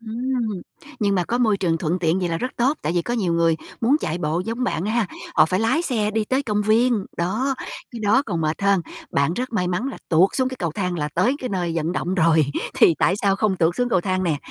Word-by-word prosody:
Ừm, 230 -3 -3 0.4
nhưng 200 -2 +2
mà 180 - +1
có 240 +5 -1
môi 220 -4 +3
trường 170 -4 0
thuận 175 +2 -1
tiện 170 +1 +1
vậy 180 - -1
là 165 - -1
rất 255 - -2
tốt, 265 +5 +1
tại 155 - -1
vì 175 -1 +1
có 240 - -2
nhiều 190 -7 0
người 165 -1 +2 0.2
muốn 255 +6 +4
chạy 170 -1 -2
bộ 165 +1 -1
giống 230 +4 -2
bạn 185 -5 -1
ha, 220 0 +1 0.3
họ - - +6
phải 185 +3 0
lái 260 +9 +2
xe 220 -10 0
đi 220 0 0
tới 260 +5 0
công 210 -5 0
viên, 220 0 +2
đó, 220 +11 0 0.4
cái 235 - -8
đó 220 +6 +3
còn 175 -6 -2
mệt 155 +4 -2
hơn. 200 -1 +3 0.3
Bạn 140 +4 +1
rất 250 +2 -4
may 180 -5 0
mắn 180 +8 -1
là 275 - -7
tuột 180 +4 +4
xuống 260 -1 +1
cái 260 - -7
cầu 170 -6 -2
thang 180 0 -2
là 150 -1 -1
tới 220 +10 +2
cái 255 - -4
nơi 180 -5 -2
vận 165 +2 -1
động 180 0 -2
rồi, 160 -4 +3 0.3
thì 165 - +5
tại 185 - +3
sao 200 -1 +1
không 195 -2 +1
tuột 170 +1 +1
xuống 245 0 +1
cầu 190 -6 +2
thang 185 0 -1
nè. 160 -4 +1
195 Hz, 260 wpm, -22 LUFS, 170-235 Hz, 0.4 s, họ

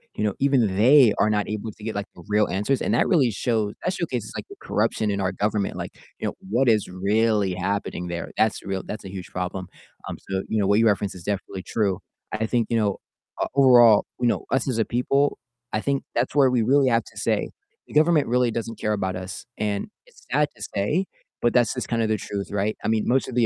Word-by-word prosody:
you 105 - -2
know, 105 -2 +1
even 130 -8 +2
they 125 0 +6
are 105 - +4
not 105 -1 0
able 110 +1 -4
to 105 - -13
get, 110 0 -3
like, 100 0 -3
the 85 - -13
real 105 0 +3
answers, 105 +9 0
and - - 0
that 115 - +3
really 135 - +3
shows 110 -1 -1
that 180 - 0
showcases, 125 - -3
like, - - -5
the - - -10
corruption 110 -2 0
in 100 - -2
our 95 -1 0
government. 105 0 -1
Like, - - -5 0.3
you - - -4
know, - - -3 0.2
what 120 +4 +3
is 110 -3 +2
really 100 +1 +1
happening 95 -1 -2
there? 85 -1 -5
That's 110 -1 +1
real 95 -1 -3
that's 105 - -6
a 95 - -7
huge 95 -2 -7
problem. 90 0 -4 0.4
Um, - - -4
so, 95 0 0
you 110 - -1
know, 100 - +2
what 100 +2 +4
you 115 - +4
referenced 100 -2 0
is 90 - -10
definitely 95 -1 -4
true. 100 -4 0 0.3
I 110 +1 -1
think, 115 -1 +1
you 115 - +1
know, 105 -3 +1 0.4
uh, - - +1
overall, 120 -6 +7
you 120 - +2
know, - - 0
us 135 - +1
as 120 - -1
a 110 - +2
people, 140 +4 +1 0.4
I 110 - 0
think 140 +2 -1
that's - - 0
where 140 -3 +5
we 125 -2 +2
really 135 +3 +4
have 115 -1 +2
to - - -16
say - - 0 0.4
the - - -13
government 155 -1 +4
really 125 0 +2
doesn't 115 -1 -4
care 105 - 0
about 95 -3 -2
us. 95 +1 -7
And 105 -1 -2 0.2
it's - - -21
sad 150 0 +3
to - - -10
say, 145 - 0 0.4
but 120 - +3
that's 120 -3 +3
just 125 - -4
kind 115 -1 0
of 110 - +1
the 110 - +2
truth, 100 0 -5
right? 105 +1 0
I - - -1
mean, 110 -1 +1
most 130 +2 +2
of 125 - -6
the 120 -2 +4
110 Hz, 245 wpm, -24 LUFS, 100-125 Hz, 0.4 s, overall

